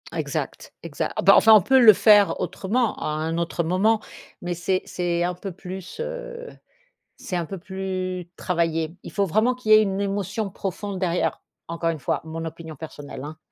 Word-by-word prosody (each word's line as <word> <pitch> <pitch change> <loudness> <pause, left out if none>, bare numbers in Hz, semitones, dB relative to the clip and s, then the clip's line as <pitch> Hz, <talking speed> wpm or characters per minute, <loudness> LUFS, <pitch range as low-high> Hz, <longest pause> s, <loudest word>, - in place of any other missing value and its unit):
Exact, - - -4
exact. - - -3
Ah, - - +1
bah - - +7
enfin 220 0 +7
on 210 - +8
peut 265 +5 +4
le 225 -3 +10
faire 205 0 +5
autrement 210 +6 -1
à - - -5
un 160 +2 -2
autre 170 0 -1
moment 200 +6 +2 0.4
mais 175 0 -2
c'est 185 +2 -1
c'est 175 -1 -1
un 180 0 0
peu 190 +2 -7
plus, 185 - -9
heu, - - -6 0.7
c'est 180 - -5
un 170 -2 -2
peu 195 - -6
plus 185 -1 -4
travaillé. 165 -2 -1
Il - - -9
faut 200 - +1
vraiment 220 +7 +2
qu'il 220 -4 0
y - - +11
ait 215 - +6
une 195 -1 -1
émotion 200 +1 -2
profonde 195 +1 -5
derrière, 180 -2 0 0.3
encore 170 0 -2
une 165 -2 -1
fois 130 - -1
mon 165 +1 -6
opinion 160 -1 -8
personnelle, 145 -3 -9
hein. 155 +1 -8
185 Hz, 190 wpm, -24 LUFS, 170-205 Hz, 0.7 s, y